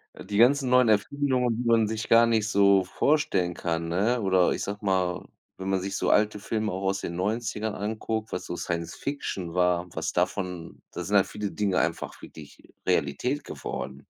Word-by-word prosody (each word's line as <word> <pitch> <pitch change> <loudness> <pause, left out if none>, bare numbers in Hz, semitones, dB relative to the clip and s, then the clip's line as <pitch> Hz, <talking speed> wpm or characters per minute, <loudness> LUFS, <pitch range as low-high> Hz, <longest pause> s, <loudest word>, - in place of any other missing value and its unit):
Äh, - - -10
die 100 - -3
ganzen 130 +2 +4
neuen 125 -1 +5
Erfindungen, 125 +2 +1
die 125 - -3
man 115 -2 +4
sich 110 0 -4
gar 115 +1 +6
nicht 110 -2 +1
so 100 -2 +4
vorstellen 95 - +1
kann, 85 -1 -2
ne? 105 +9 +1
Oder 95 -3 +3
ich - - -3
sage 105 +1 -5
mal, 95 -2 0 0.3
wenn 95 0 -6
man 95 -1 +1
sich 95 +1 -4
so - - 0
alte 105 0 +3
Filme 110 +1 -2
auch 95 +1 -4
aus 95 0 -1
den 85 - -5
90er 105 +2 -2
anguckt, 110 +1 -3
was - - -3
so 85 - -5
Science-Fiction 85 - -4
war, 90 -1 +2
was - - -2
davon 90 -3 -3
da 90 - -5
sind 100 +4 +1
halt 100 -1 +5
viele 105 +1 -4
Dinge 100 -3 0
einfach - - -2
wirklich 75 -2 -13
Realität 125 - 0
geworden. 70 +1 -6
100 Hz, 185 wpm, -26 LUFS, 90-115 Hz, 0.3 s, gar